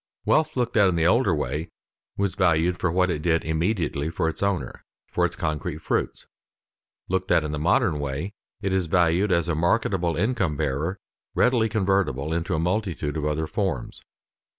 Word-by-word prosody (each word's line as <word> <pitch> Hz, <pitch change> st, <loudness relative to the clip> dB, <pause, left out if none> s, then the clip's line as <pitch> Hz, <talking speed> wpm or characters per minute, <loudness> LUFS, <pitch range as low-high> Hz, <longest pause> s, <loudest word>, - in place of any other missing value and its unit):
Wealth 155 Hz, -2 st, +2 dB
looked 120 Hz, -1 st, 0 dB
at 100 Hz, -3 st, +6 dB
in 90 Hz, -, 0 dB
the 80 Hz, -1 st, +1 dB
older 100 Hz, -1 st, +3 dB
way 75 Hz, +2 st, -3 dB, 0.5 s
was 100 Hz, -1 st, 0 dB
valued 85 Hz, 0 st, +2 dB
for 85 Hz, -, +1 dB
what 90 Hz, +1 st, +2 dB
it 75 Hz, -, -2 dB
did 80 Hz, 0 st, +1 dB
immediately 80 Hz, -2 st, -1 dB
for 80 Hz, 0 st, -1 dB
its 80 Hz, -, -4 dB
owner, 100 Hz, -3 st, -2 dB, 0.3 s
for -, -, +2 dB
its -, -, -9 dB
concrete 75 Hz, +1 st, -3 dB
fruits; 80 Hz, -, -2 dB, 0.8 s
looked 95 Hz, 0 st, -1 dB
at 80 Hz, -, +4 dB
in 75 Hz, -, -3 dB
the 75 Hz, -, -3 dB
modern 80 Hz, 0 st, +2 dB
way, 70 Hz, +8 st, -3 dB, 0.3 s
it 95 Hz, -1 st, 0 dB
is 95 Hz, -3 st, +1 dB
valued 90 Hz, +3 st, +2 dB
as 85 Hz, -2 st, +2 dB
a 85 Hz, -, +1 dB
marketable 85 Hz, 0 st, +1 dB
income 90 Hz, -, 0 dB
bearer 75 Hz, +6 st, -1 dB, 0.4 s
readily 120 Hz, -3 st, +3 dB
convertible 95 Hz, -8 st, 0 dB
into 85 Hz, -1 st, -1 dB
a -, -, 0 dB
multitude 90 Hz, -4 st, -1 dB
of 75 Hz, -2 st, -2 dB
other 75 Hz, +1 st, 0 dB
forms. 95 Hz, -, -3 dB
85 Hz, 175 wpm, -25 LUFS, 80-95 Hz, 0.8 s, at